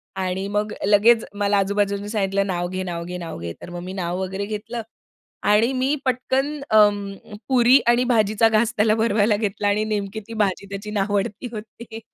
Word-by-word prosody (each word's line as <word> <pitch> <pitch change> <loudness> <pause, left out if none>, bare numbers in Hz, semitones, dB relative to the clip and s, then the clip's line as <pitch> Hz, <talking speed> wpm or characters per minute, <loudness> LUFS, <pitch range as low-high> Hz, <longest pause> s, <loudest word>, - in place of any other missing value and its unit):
आणि 190 +1 -2
मग 210 +1 -1
लगेच 215 +3 +5
मला 205 0 +1
आजूबाजूनी 200 +1 0
सांगितलं 200 -2 0
नाव 175 -2 -1
घे, 185 +1 -3
नाव 170 -2 -4
घे, 180 +1 -5
नाव 170 - -7
घे. 85 0 -5
तर - - -9
मग 175 0 -6
मी 185 +1 -6
नाव 180 -1 -3
वगैरे 190 +2 -3
घेतलं. 220 +3 -5 0.6
आणि 215 +4 +3
मी 265 +3 +1
पटकन 260 +2 0 0.2
अं, 205 -1 +2
पुरी 255 +1 +6
आणि 240 +1 +4
भाजीचा 215 0 +3
घास 220 +2 +2
त्याला 215 +1 +3
भरवायला 220 -1 +2
घेतला 205 -1 -2
आणि 205 +1 +2
नेमकी 210 -1 -3
ती 230 - -8
भाजी 195 +1 -4
त्याची 200 +2 -6
नावडती 205 +2 -1
होती. 220 +1 -9
205 Hz, 180 wpm, -22 LUFS, 195-225 Hz, 0.6 s, पुरी